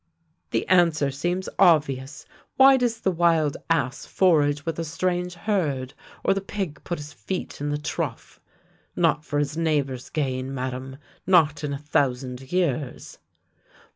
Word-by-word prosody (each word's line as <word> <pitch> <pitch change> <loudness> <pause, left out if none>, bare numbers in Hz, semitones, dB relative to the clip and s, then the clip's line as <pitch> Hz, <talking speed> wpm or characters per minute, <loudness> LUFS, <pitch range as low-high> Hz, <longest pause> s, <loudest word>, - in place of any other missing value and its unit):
" 165 -1 -44
" - - -50
The - - -1
answer 165 -6 +3
seems 175 +7 -2
obvious. 150 -5 +3 0.3
Why 270 0 +8
does 240 -3 0
the 190 - +2
wild 165 -4 +2
ass 135 -5 0
forage 145 -6 +2
with 165 -1 -3
a - - -1
strange 175 +2 -2
herd, 155 -9 -1 0.3
or - - +3
the 195 - -2
pig 190 -7 -5
put 175 - -3
his 150 +1 -9
feet 185 -6 -5
in 145 - -1
the 145 - 0
trough? 150 -4 -5 0.6
Not 150 - +2
for 145 - -3
his 145 +1 -1
neighbour's 145 -6 -1
gain, 135 -3 -2
Madame, 130 +1 -5 0.3
jiot 160 -5 +4
in 145 - -2
a - - -2
thousand 130 -3 -1
years! 150 -8 -2
150 Hz, 155 wpm, -25 LUFS, 135-175 Hz, 0.6 s, Why